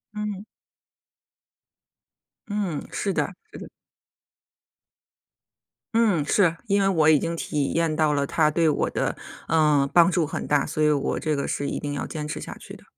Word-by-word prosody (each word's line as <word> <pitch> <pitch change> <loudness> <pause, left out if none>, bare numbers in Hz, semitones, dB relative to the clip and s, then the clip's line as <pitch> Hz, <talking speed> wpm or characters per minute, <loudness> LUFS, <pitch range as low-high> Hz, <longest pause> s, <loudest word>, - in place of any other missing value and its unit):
嗯。 210 -1 -4 2.0
嗯， 200 -8 -3
是 195 - -2
的。 200 - -1 0.2
是。 - - -9 2.3
嗯， 205 -10 +3
是， 170 0 +2
因 200 -2 +2
为 195 - +2
我 165 -5 +3
已 155 -2 +6
经 170 +3 -2
体 150 -4 -2
验 165 -2 +1
到 155 -1 +2
了 140 -1 +1
它 155 +2 +2
对 165 +2 +1
我 150 - +1
的， - - -2 0.3
呃， 150 -3 +3
帮 170 -1 +6
助 170 -3 +1
很 - - -5
大， 145 -2 +2
所 155 - -3
以 150 - +4
我 145 -2 -1
这 155 -1 -1
个 140 - -2
是 140 - -2
一 - - -3
定 145 -1 -4
要 145 - -4
坚 150 -1 -5
持 150 - -5
下 - - -8
去 - - -11
的。 - - -16
155 Hz, 180 characters per minute, -24 LUFS, 150-185 Hz, 2.3 s, 已